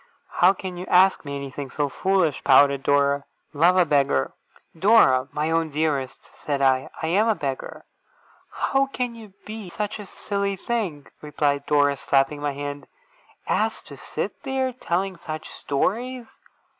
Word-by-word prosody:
'How 180 +2 +6
can 185 -2 -7
you 180 - -7
ask 190 +1 +4
me 140 0 -5
anything 140 0 -6
so 145 +1 -1
foolish?' 180 0 0
pouted 140 0 +5
Dora. 140 0 +2 0.3
'Love 170 +5 +4
a 180 - +5
beggar!' 140 - +1 0.4
'Dora, 160 - +4
my 150 +2 -1
own 165 -1 +1
dearest!' 145 -3 -2
said 145 -2 -4
I. 130 -1 +2
'I - - +1
am 200 +7 +2
a 220 - +3
beggar!' 135 -6 -5 0.7
'How 275 0 +1
can 250 -3 -3
you 220 -4 -13
be 215 -3 -7
such 210 +4 -4
a 205 - -8
silly 200 0 -3
thing,' 190 -9 -3 0.2
replied 145 -1 -1
Dora, 145 -1 +3
slapping 135 +2 +1
my 145 -1 -1
hand, 145 0 -6 0.6
'as - - -1
to - - -11
sit - - -5
there, 265 -1 -1
telling 190 -5 -2
such 155 -2 -7
stories? 240 - -2
155 Hz, 155 wpm, -24 LUFS, 140-200 Hz, 0.7 s, How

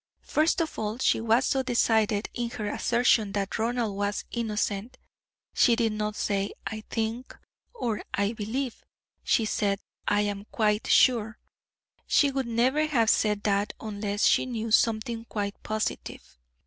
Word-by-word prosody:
First 320 +4 +1
of 320 - -3
all 215 +1 -2
she 260 -3 +2
was 230 +3 +3
so 270 - +1
decided 225 -4 +1
in 240 -1 -2
her 215 -3 -5
assertion 235 -2 +2
that 200 0 -2
Ronald 230 -2 -1
was 205 +1 -2
innocent; 220 +1 -2 0.6
she 240 - +4
did 230 -2 +1
not 210 0 -2
say 200 -1 -1
'I 215 -1 -5
think,' 225 +3 -3 0.4
or 230 - -2
'I 200 +2 0
believe,' 235 +4 -4 0.4
she 225 - +2
said 200 -2 0 0.3
'I 205 - +3
am 205 -1 -3
quite 210 -1 +1
sure.' 225 -4 +4 0.7
She 285 -1 +4
would 270 -2 -2
never 255 +7 +2
have 235 -7 +3
said 210 -1 +1
that 205 0 +1
unless 205 -1 -2
she - - +3
knew 230 -2 -4
something 225 +1 +2
quite 205 -2 -4
positive. 215 - -4
220 Hz, 150 wpm, -27 LUFS, 210-240 Hz, 0.7 s, she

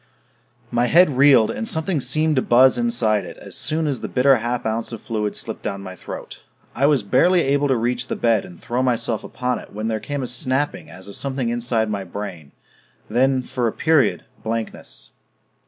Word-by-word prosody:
My 120 +1 +2
head 165 -1 +5
reeled, 135 -4 +5
and 225 - -4
something 160 -3 -1
seemed 155 +5 +1
to - - +4
buzz 130 +2 +5
inside 115 - +1
it - - -9
as - - -7
soon 160 +1 -1
as 140 -4 -2
the - - -3
bitter 135 +1 +4
half 120 +2 -3
ounce 110 +2 -2
of 115 - -6
fluid 105 -2 -3
slipped - - -6
down 100 0 -4
my 95 -1 -8
throat. - - -9 0.3
I 140 +3 +2
was 145 -7 +3
barely 170 - +3
able 140 0 +1
to 135 - +2
reach 120 +1 -1
the - - -2
bed 115 -4 +2
and 90 -2 -12
throw 120 +2 -2
myself 120 -3 0
upon 125 -1 -2
it - - -14
when 110 +2 -3
there 110 -1 -1
came 145 +3 -4
a - - -3
snapping 135 +7 -2
as 95 +1 -11
of 100 - -7
something 130 -3 -1
inside 120 -1 0
my 100 -2 -2
brain... 90 -5 -7 0.6
then, 130 +1 +2
for 125 -2 -2
a - - 0
period, 155 -3 +2 0.2
blankness 115 0 -5
125 Hz, 200 wpm, -21 LUFS, 110-140 Hz, 0.6 s, head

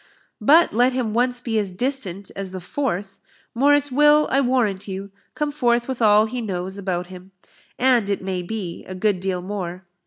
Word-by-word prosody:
But 315 +10 +5
let 245 +3 +3
him 245 -4 -1
once 245 +1 +1
be 225 -3 -1
as 195 -3 -3
distant 200 -5 -4
as 195 -1 -5
the 185 0 -6
Forth, 200 -1 -3 0.3
Morris 290 +3 +3
will, 295 +2 +5
I 275 - +3
warrant 230 -7 0
you, 195 +1 -6 0.2
come 300 -1 -1
forth 240 -4 +1
with 260 -2 -4
all 210 -1 +6
he 245 +2 -4
knows 190 -3 -4
about 180 -2 -2
him, 185 +1 -13 0.4
and, 245 -5 +3
it 200 -2 -1
may 185 -1 -2
be, 180 -2 -5
a 185 - -7
good 200 0 +1
deal 185 -1 -2
more. 185 -2 -5
215 Hz, 185 wpm, -22 LUFS, 190-255 Hz, 0.4 s, all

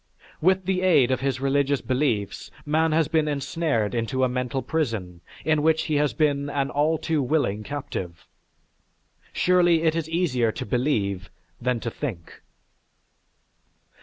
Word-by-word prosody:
With 185 +2 +3
the 185 0 0
aid 150 -9 +4
of 130 - +1
his 135 -1 -1
religious 140 0 +1
beliefs 125 -7 -1 0.2
man 160 +2 +2
has 160 -1 +2
been 155 -1 +1
ensnared 145 -6 -1
into 120 +3 -1
a - - +4
mental 125 +1 -2
prison 110 - -2 0.2
in 155 -1 +2
which 160 +1 +2
he 150 - 0
has 150 -1 +2
been 145 -2 0
an 140 -1 -1
all 155 +3 +2
too 155 -1 -1
willing 125 -7 0
captive. 100 - -6 1.1
Surely 175 -2 +3
it 160 -1 +2
is 165 -1 -2
easier 135 -10 +1
to - - -5
believe 100 -6 -1 0.3
than 125 -1 0
to 115 - -3
think. 110 - -6
140 Hz, 145 wpm, -25 LUFS, 120-160 Hz, 1.1 s, aid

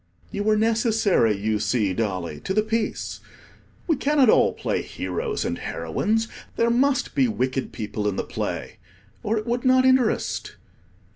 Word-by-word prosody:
You 200 - -3
were 215 0 +3
necessary, 220 - +2
you 105 +1 -1
see, 105 -1 +1
Dolly, 90 -7 -3
to 190 - -1
the 215 - +3
piece. 220 0 -2 0.7
We 325 - +2
cannot 280 -5 +4
all - - +4
play - - -2
heroes 450 -2 -3
and - - -2
heroines. 225 +2 -1 0.3
There 235 0 +2
must 265 +2 +1
be 270 -2 +3
wicked 130 - -2
people 105 -1 -3
in 100 - 0
the - - -1
play, - - -4 0.4
or 220 +2 0
it 215 - -3
would 240 +1 -1
not 255 0 +4
interest. 260 -3 +1
220 Hz, 155 wpm, -24 LUFS, -, 0.7 s, cannot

